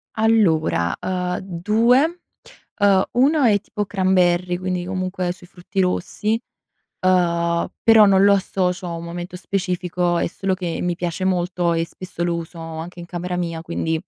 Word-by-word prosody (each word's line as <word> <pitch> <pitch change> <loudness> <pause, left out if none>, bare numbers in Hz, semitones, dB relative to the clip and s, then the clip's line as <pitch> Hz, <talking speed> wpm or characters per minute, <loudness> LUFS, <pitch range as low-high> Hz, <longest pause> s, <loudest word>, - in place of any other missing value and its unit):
Allora, 165 - +2
uhm, 180 -1 -2
2, 230 - +2 0.6
uhm, 195 -2 +4
1 280 +4 +3
è 210 -4 +4
tipo 205 0 -4
cranberry 185 -2 +2
quindi, 180 -1 -3
comunque, 185 -1 -2
sui 175 0 -12
frutti 180 +2 -6
rossi, 210 +4 0 0.6
uhm, 170 -2 +2 0.2
però 225 -2 +7
non 195 -1 +5
lo 200 - +6
associo 185 -2 -1
a 170 - -4
un 165 - -7
momento 175 +1 -6
specifico 180 -2 -1
è - - 0
solo 190 +2 -2
che 175 -3 -4
mi 175 -1 -1
piace 175 +1 -3
molto, 180 -1 0
e 165 0 0
spesso 180 0 -7
lo 170 -1 0
uso 165 0 -8
anche 165 +2 -7
in 170 - -7
camera 180 +1 -4
mia 165 -2 -3
quindi, 160 -1 -2
180 Hz, 155 wpm, -21 LUFS, 170-195 Hz, 0.6 s, però